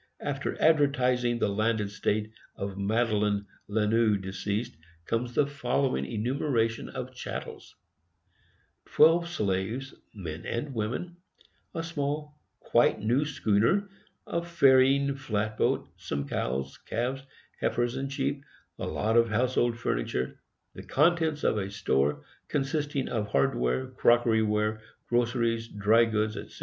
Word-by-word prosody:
After 140 -1 -3
advertising 125 -6 +3
the 115 - +1
landed 110 +1 +1
estate 105 +1 -1 0.2
of 100 -1 -4
Madeline 105 0 +1 0.2
Lanoux, 110 +1 +2
deceased, 100 +3 -3 0.3
comes 120 +3 -2
the 145 - +4
following 135 - -1
enumeration 115 - -1
of - - -6
chattels: - - -7 1.1
Twelve 170 +1 +5
slaves, 110 - -2 0.2
men 85 -5 -6
and 130 +4 -3
women; 125 +11 -3 0.6
a 165 - -2
small, 150 -2 -3 0.2
quite - - +3
new 125 +7 +1
schooner; 135 - +1 0.4
a 170 - -1
ferrying 140 -4 +4
flat 110 -5 -2
boat; - - +1
some 70 0 -4
cows, 65 +1 -3
calves, 125 +4 -2 0.4
heifers 120 0 0
and 135 0 -3
sheep; 140 +1 -2 0.4
a - - -3
lot 110 +2 0
of 115 -1 +5
household 120 +1 +1
furniture; 65 - -2 0.3
the - - -9
contents 160 0 +2
of 105 - +2
a 95 -1 -3
store, 75 -9 0 0.2
consisting 145 -1 -1
of 110 -4 -2
hardware, 70 - +1
crockery 120 -3 +3
ware, 105 0 0 0.3
groceries, 115 -1 +1
dry 110 +2 +4
goods, 110 -1 -1
etc. - - -9
115 Hz, 120 wpm, -28 LUFS, 105-135 Hz, 1.1 s, Twelve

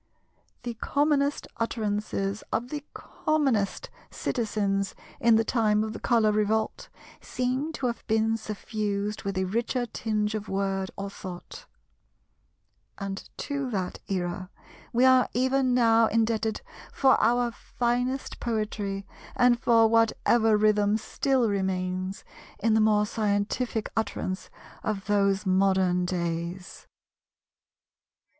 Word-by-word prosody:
The 240 -1 -3
commonest 285 +4 +1
utterances 210 -3 -2
of 240 +2 -1
the 295 0 -5
commonest 265 -11 -1 0.2
citizens 200 -4 -1 0.2
in 235 -1 +5
the 225 - +4
time 215 -2 +2
of 220 0 -4
the - - -7
Colour 225 -3 +3
Revolt 215 +1 0 0.3
seem 255 +5 -2
to 275 - -4
have 235 -1 -2
been 220 0 +2
suffused 210 -1 -3
with 195 -1 -3
a 190 - +1
richer 235 +5 -1
tinge 215 -2 -2
of 215 -1 -4
word 195 -1 -1
or 200 0 -4
thought; 185 - -9 1.3
and 195 -1 -6
to 280 -2 -3
that 190 -5 -3
era 185 -1 -3 0.4
we 245 +2 +3
are 260 -1 +5
even 260 0 +2
now 230 -2 +5
indebted 220 -1 0 0.3
for 265 -1 +4
our 240 +1 +3
finest 245 +3 -2
poetry 210 -3 -2 0.3
and 245 -1 +4
for 230 -1 +5
whatever 225 0 +3
rhythm 210 0 +3
still 255 +2 0
remains 185 -1 -2 0.3
in 225 +1 +1
the 220 - +4
more 210 -1 +4
scientific 210 +2 -1
utterance 200 -3 -2 0.3
of 205 -2 -2
those 200 -1 +2
modern 190 -1 +2
days. 175 +1 -4
215 Hz, 115 wpm, -27 LUFS, 195-235 Hz, 1.3 s, in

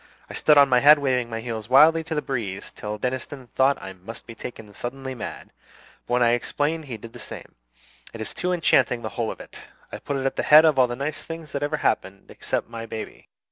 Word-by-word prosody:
I - - -7
stood 150 -1 +4
on 140 -1 +8
my 125 -2 +4
head 150 +3 +8
waving 130 -4 0
my 115 -1 -4
heels 115 -2 -5
wildly 155 +5 +6
to 160 - -3
the 150 - -1
breeze 105 -8 -4
till 105 0 -6
Deniston 130 +2 -4
thought 135 +1 +3
I 95 0 -8
must 95 +5 -10
be 115 - -9
taken 110 -3 -9
suddenly 130 +4 -5
mad; 120 - -8 0.6
but - - -3
when 125 - +3
I 120 - +4
explained 145 +6 -1
he 125 -5 -6
did 115 +2 -12
the - - -10
same. - - -9 0.6
It 115 - -10
is 110 - -5
too 180 0 -1
enchanting, 130 -8 +2
the 110 - -3
whole 115 -1 -2
of - - -7
it. - - -11 0.2
I - - -6
put 140 - -3
it 135 - -3
at 135 - -1
the - - +1
head 155 +2 +7
of 150 -4 +3
all 125 - +6
the 120 - -4
nice 140 +4 -4
things 165 -2 -8
that 140 - -3
ever 145 +1 -1
happened, 100 -8 -2
except - - -3
my 115 0 -7
baby. 110 0 -8
130 Hz, 240 wpm, -24 LUFS, 115-145 Hz, 0.6 s, on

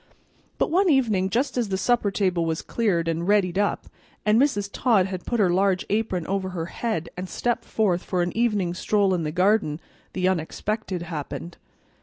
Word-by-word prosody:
But - - 0
one 370 +2 +3
evening, 220 - +2
just 255 +4 0
as 230 -4 -1
the 190 - 0
supper 235 +1 +2
table 185 -3 0
was 160 -1 -2
cleared 185 -8 0
and 165 +1 -1
"readied 200 -3 +2
up," 205 - 0 0.4
and 215 +3 +4
Mrs. 255 -9 +1
Todd 220 -7 +3
had 185 -2 -6
put 240 - 0
her 190 -4 +4
large 190 0 +2
apron 205 -5 0
over 195 0 -2
her 175 -3 -4
head 220 -9 -2
and 180 +1 -6
stepped 240 -1 -1
forth 190 -5 +1
for 180 -2 -1
an 175 - -3
evening 210 -7 +1
stroll 200 +1 +1
in 175 - 0
the 155 -1 -2
garden, 180 -3 +2 0.3
the 185 0 0
unexpected 190 +2 -2
happened. 165 +1 -6
190 Hz, 185 wpm, -24 LUFS, 175-220 Hz, 0.4 s, and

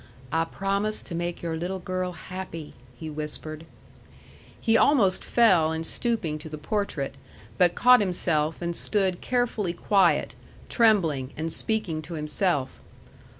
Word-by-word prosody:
"I 165 0 +1
promise 200 +4 -2
to - - -6
make 175 +1 -4
your 165 -1 -2
little 175 +4 -3
girl 185 -1 -3
happy," 170 -3 -8 0.2
he 160 - -7
whispered. 155 +1 -4 0.9
He 225 -1 +2
almost 225 -8 +4
fell 185 -10 +4
in 160 0 -3
stooping 170 -7 -1
to 155 - -9
the 155 - -6
portrait, 150 -4 -3 0.5
but 175 -1 +4
caught 250 0 +6
himself 170 -5 -1
and 170 0 -2
stood 190 -3 +1
carefully 235 -7 -1
quiet, 190 0 +2 0.4
trembling, 165 - +2
and 160 +1 -2
speaking 185 -3 0
to 165 +2 -8
himself. 150 -1 0
175 Hz, 135 wpm, -26 LUFS, 160-200 Hz, 0.9 s, caught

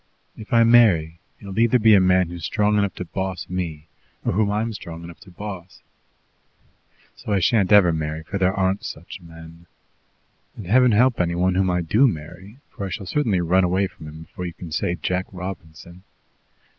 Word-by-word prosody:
If 110 - -12
I 115 -1 +5
marry, 95 -9 +4 0.2
it - - -15
will 100 +2 -5
either 115 +2 +4
be 110 -2 +5
a 100 - +7
man 95 -1 +3
who's 85 -2 -8
strong 105 +4 +1
enough 100 -1 -1
to 90 - -6
boss 95 0 -4
me 85 -4 -5 0.4
or - - +1
whom 105 +2 +1
I'm 110 +2 -1
strong 85 -4 -9
enough 85 0 -11
to - - -16
boss. 90 -1 -9 1.3
So 105 - -5
I 100 - +2
shan't 100 +1 +2
ever 95 -5 +6
marry, 80 0 -4
for 100 +5 -5
there 95 -1 +3
aren't 95 +1 -1
such 85 +4 -8
men. 85 0 -14 0.9
And 105 - -8
Heaven 125 +5 +4
help 125 0 +3
any 85 -1 -1
one 90 +1 +1
whom 95 0 +1
I 90 0 0
do 110 +11 +3
marry, 90 +3 -7
for 100 - -5
I - - -7
shall 95 +2 -6
certainly 105 -6 0
run 90 +2 +2
away 90 +2 +1
from 80 -4 -10
him 80 +1 -10
before 90 +3 -7
you 85 - -7
can 85 -1 -10
say 85 +3 -1
'Jack 90 +1 -2
Robinson.' 90 -2 -9
95 Hz, 195 wpm, -22 LUFS, 85-105 Hz, 1.3 s, a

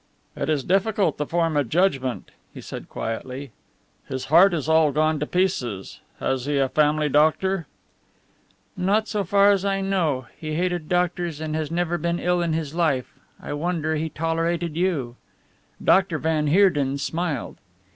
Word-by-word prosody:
"It - - -3
is 150 -4 +1
difficult 195 - +1
to 150 - -1
form 165 -2 0
a 145 - +3
judgment," 135 -2 0 0.2
he - - -11
said - - -8
quietly, 130 +4 -5 0.6
"his 130 -1 -4
heart 190 +4 +8
is 155 -4 -2
all 160 -2 +4
gone 155 +1 +1
to 150 - -2
pieces. 125 - -1 0.2
Has 130 -1 -1
he 145 -1 0
a 135 -1 +2
family 150 +1 +2
doctor?" 160 +4 +2 1.1
"Not 205 +4 +1
so 210 -2 -1
far 200 +2 +4
as 195 -2 +1
I 195 -1 0
know 170 -10 0
he 155 -1 -5
hated 175 -2 -1
doctors, 175 -3 0
and 155 -1 -3
has 155 -2 -2
never 175 +1 -1
been 170 +2 -1
ill 180 0 +1
in 170 -2 0
his 155 -2 -3
life. 155 -7 0 0.3
I - - -6
wonder 160 0 -1
he 160 +1 -2
tolerated 165 +1 -1
you." 155 -9 -1 0.7
Dr. 190 -4 +3
van 155 -1 0
Heerden 145 -6 +3
smiled. 160 -1 -3
160 Hz, 160 wpm, -23 LUFS, 145-180 Hz, 1.1 s, heart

